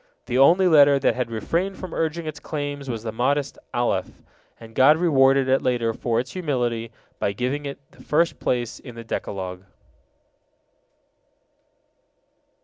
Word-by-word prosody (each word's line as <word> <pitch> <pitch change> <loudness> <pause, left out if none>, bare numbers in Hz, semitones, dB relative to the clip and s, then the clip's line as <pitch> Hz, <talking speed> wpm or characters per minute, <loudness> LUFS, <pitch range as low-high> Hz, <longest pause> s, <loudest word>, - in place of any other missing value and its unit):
The 125 +1 0
only 175 +7 +6
letter 145 -4 +6
that 135 - +2
had 125 -2 -3
refrained 170 - -2
from 185 -3 -8
urging 165 +1 -2
its 155 - -6
claims 145 -2 -5
was 115 -3 -4
the 110 - -3
modest 140 +5 -1
Alef, 110 -6 -2 0.4
and 115 -1 -13
God 140 +6 +6
rewarded 135 -5 +4
it 135 +1 +3
later 120 -3 0
for 115 0 -1
its 125 +1 -4
humility 120 -9 -2 0.3
by 100 - 0
giving 130 +6 -2
it 140 - -6
the - - -18
first 165 +3 +1
place 120 -1 -2
in 120 -4 -11
the 115 - -8
Decalogue. 95 -4 -5
130 Hz, 145 wpm, -23 LUFS, 115-150 Hz, 0.4 s, only